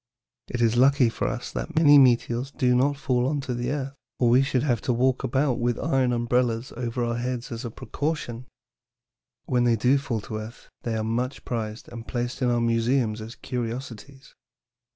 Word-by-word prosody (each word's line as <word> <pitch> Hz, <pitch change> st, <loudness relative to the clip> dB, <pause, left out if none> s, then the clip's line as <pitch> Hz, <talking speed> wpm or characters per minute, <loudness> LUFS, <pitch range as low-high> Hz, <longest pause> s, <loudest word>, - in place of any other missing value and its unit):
It 120 Hz, -, -3 dB
is 115 Hz, +1 st, +2 dB
lucky 135 Hz, -1 st, +5 dB
for -, -, -2 dB
us 120 Hz, -, -4 dB
that 165 Hz, -, -5 dB
many 145 Hz, -3 st, +7 dB
meteors 120 Hz, 0 st, +3 dB
do 125 Hz, -3 st, +1 dB
not 140 Hz, +3 st, +2 dB
fall 125 Hz, -2 st, 0 dB
on 145 Hz, +1 st, 0 dB
the 125 Hz, -2 st, -3 dB
earth, 135 Hz, -1 st, -3 dB, 0.2 s
or 120 Hz, -2 st, +3 dB
we 125 Hz, +2 st, +6 dB
should 135 Hz, -2 st, 0 dB
have 120 Hz, -7 st, +1 dB
to -, -, 0 dB
walk 130 Hz, +2 st, +1 dB
about 130 Hz, +1 st, +1 dB
with 120 Hz, -1 st, 0 dB
iron 135 Hz, -5 st, +1 dB
umbrellas 120 Hz, 0 st, 0 dB
over 120 Hz, 0 st, -2 dB
our 120 Hz, 0 st, -1 dB
heads 125 Hz, +1 st, -3 dB
as 115 Hz, +2 st, -5 dB
a -, -, -3 dB
protection. 125 Hz, -1 st, -4 dB, 1.0 s
When 125 Hz, -1 st, +1 dB
they 120 Hz, -1 st, +3 dB
do 125 Hz, +5 st, +3 dB
fall 120 Hz, -6 st, -3 dB
on 110 Hz, 0 st, -3 dB
earth, 110 Hz, +3 st, -11 dB
they 115 Hz, -2 st, -2 dB
are 110 Hz, -, -1 dB
much 120 Hz, +4 st, -2 dB
prized 110 Hz, -2 st, -4 dB
and 115 Hz, -1 st, -9 dB
placed 120 Hz, +1 st, -3 dB
in 125 Hz, -, +2 dB
our 120 Hz, -1 st, +1 dB
museums 115 Hz, -1 st, +1 dB
as 110 Hz, +2 st, -8 dB
curiosities. 125 Hz, +1 st, -6 dB
125 Hz, 190 wpm, -25 LUFS, 115-135 Hz, 1.0 s, many